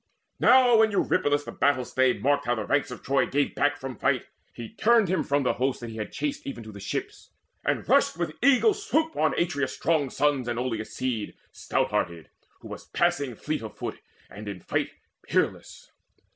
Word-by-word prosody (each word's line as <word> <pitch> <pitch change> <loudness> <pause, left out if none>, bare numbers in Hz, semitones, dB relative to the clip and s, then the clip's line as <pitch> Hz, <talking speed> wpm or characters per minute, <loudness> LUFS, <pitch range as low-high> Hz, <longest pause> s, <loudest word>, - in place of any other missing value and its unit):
Now 250 -2 +6
when 220 0 +5
Eurypylus 145 -7 +1
the - - -7
battle 135 -3 +1
stay 130 0 +2
Marked 145 +1 0
how 120 - +2
the 110 -2 -4
ranks 145 0 +1
of 125 - -9
Troy 140 +1 +2
gave 145 +1 0
back 145 0 +1
from 135 -2 -6
fight, - - 0 0.3
He 115 -2 -8
turned 225 -4 +3
him 185 -3 +1
from 140 0 +1
the 125 - +2
host 130 0 +1
that 120 -1 -6
he 110 - -8
had 105 -1 -5
chased 145 0 -4
Even 120 -4 -6
to 110 - -10
the 100 - -10
ships, 100 - -5 0.3
and - - -1
rushed - - +3
with 170 -3 -2
eagle 280 - +5
swoop 320 -6 -1
On 155 - +1
Atreus' 145 -6 -1
strong 150 -3 +1
sons 140 -2 0
and 120 -1 -2
Oileus' 115 -3 -3
seed 125 -5 -3 0.2
Stout - - -1
hearted, 85 -2 -2 0.3
who - - -10
was - - -9
passing 135 -4 0
fleet 155 +5 -3
of 110 -1 -9
foot - - -5 0.3
And 105 +1 -10
in 100 -3 -5
fight - - -1 0.3
peerless. - - -2
140 Hz, 200 wpm, -26 LUFS, 120-160 Hz, 0.3 s, Now